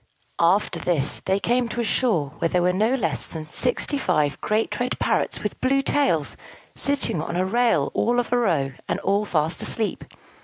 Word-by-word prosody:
After 180 +5 +2
this 155 -5 0
they 190 +1 +1
came 240 +3 +1
to 240 - -5
a - - +1
shore 185 - +1
where 165 - +1
there 180 0 +1
were 180 0 +2
no 220 +7 +2
less 165 - -1
than 160 -2 -7
sixty 250 - 0
five 150 - 0
great 215 +1 -1
red 250 +1 -1
parrots - - 0
with - - -4
blue 275 +1 +2
tails, 220 - +1 0.4
sitting 280 - 0
on 170 - -4
a 185 +1 +1
rail 235 +4 +2
all 240 +1 +1
of 245 0 -2
a - - +4
row, 155 - +1 0.2
and - - -1
all 200 +2 +1
fast 160 -3 0
asleep. 220 -2 -1
205 Hz, 190 wpm, -23 LUFS, 165-245 Hz, 0.4 s, a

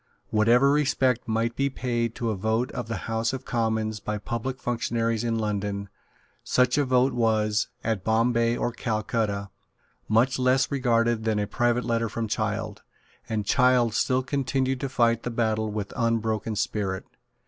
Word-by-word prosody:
Whatever 120 +5 +4
respect 135 -5 +1
might 115 +1 0
be 140 0 +1
paid 120 -3 -2
to 115 -2 -1
a - - -2
vote 110 +5 0
of 120 - -5
the 115 -5 -4
House 115 +1 -1
of 130 0 -5
Commons 110 -2 -1
by 105 +1 -3
public 115 +5 -4
functionaries 115 -2 -1
in 115 -1 0
London, 100 -2 -2 0.5
such 125 0 +2
a 145 - +2
vote 130 0 +3
was, 110 -3 +1 0.2
at 110 -4 -1
Bombay 115 +2 +2
or 120 - -1
Calcutta, 110 -4 -2 0.6
much 120 +5 +3
less 130 +1 +2
regarded 120 -4 +1
than 110 -1 0
a 105 - 0
private 120 +3 0
letter 115 -1 0
from 115 0 -3
Child; 110 0 -2 0.5
and 110 -2 -1
Child 125 -1 +3
still 130 +2 +1
continued 135 -1 -1
to 135 - -3
fight 115 -3 +2
the 120 - -3
battle 110 -2 0
with 105 -1 -4
unbroken 115 -2 0
spirit. 95 -2 -2
115 Hz, 160 wpm, -26 LUFS, 110-125 Hz, 0.6 s, Whatever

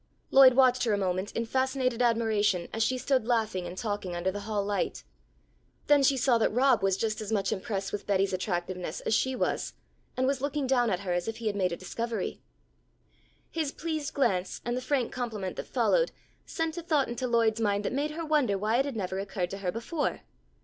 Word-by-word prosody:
Lloyd 265 -2 +8
watched 255 -1 +5
her 220 - +2
a - - +2
moment 185 0 -1
in 230 - -1
fascinated 260 0 0
admiration, 220 -6 +2
as 225 - -2
she 255 +3 +2
stood 255 -2 0
laughing 220 -7 0
and 175 +1 -8
talking 205 -5 -3
under 175 +2 0
the 205 - -5
hall 205 -1 -2
light. 205 0 -2 0.8
Then 290 -1 +5
she 275 0 +4
saw 245 -2 +3
that 220 - +2
Rob 250 -1 +3
was 195 -1 +2
just 215 +1 -1
as 215 0 -5
much 205 -3 +1
impressed 195 0 -3
with 205 - -5
Betty's 195 -1 +2
attractiveness 180 -2 -3
as - - -1
she 260 +4 +1
was, - - -1 0.4
and 260 - +2
was 265 -1 0
looking 285 -1 -1
at 235 -8 +2
her 185 -3 -2
as 175 +2 -1
if 225 - -3
he 235 - -8
had 210 -2 0
made 185 -3 +1
a 170 - -3
discovery. 230 +2 -4 1.1
His 315 -4 -1
pleased 310 -3 -4
glance 190 -9 0
and 240 0 -1
the 255 - -2
frank 255 -2 -1
compliment 220 -7 -4
that - - -5
followed - - +2 0.4
sent 325 0 -2
a - - -5
thought 310 -5 +1
into 240 +2 -3
Lloyd's 230 -2 +2
mind 205 -1 +1
that - - -1
made 285 +3 0
her 325 +2 -5
wonder 290 -10 +2
why 215 +4 +1
it 270 - +2
had 280 -4 -4
never 190 -2 -3
occurred 195 -2 -3
to 195 - -5
her 185 -2 -1
before. 275 - -2
225 Hz, 210 wpm, -29 LUFS, 195-260 Hz, 1.1 s, Lloyd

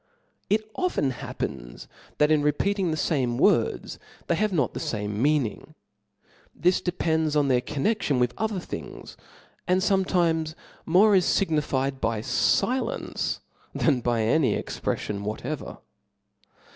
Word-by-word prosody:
It 215 +1 +1
often 360 - 0
happens - - -6 0.3
that 150 +1 +3
in 155 -1 +4
repeating 185 +6 +1
the 155 - -1
fame 130 -7 0
words, - - +1 0.3
they - - +1
have 210 +5 +1
not 145 -9 0
the - - -4
fame 105 -1 -3
meaning; 140 -6 0 0.8
thi$, 180 - +5
depends 160 -3 0
on 145 -2 +3
their 125 -1 +3
connection 150 - 0
with 125 -1 +1
other 215 -3 -2
things; - - -8 0.5
and 185 +1 +3
fometimes 175 -5 +1 0.3
more 195 +6 +5
is 185 -2 +4
fignified 140 -7 0
by 110 -1 -1
filence 255 - 0 0.3
than 140 -6 +2
by 120 -2 +1
any 130 +5 +2
expreflion 100 -1 -3
whatever. 120 +8 -5
150 Hz, 125 wpm, -26 LUFS, 125-185 Hz, 0.8 s, thi$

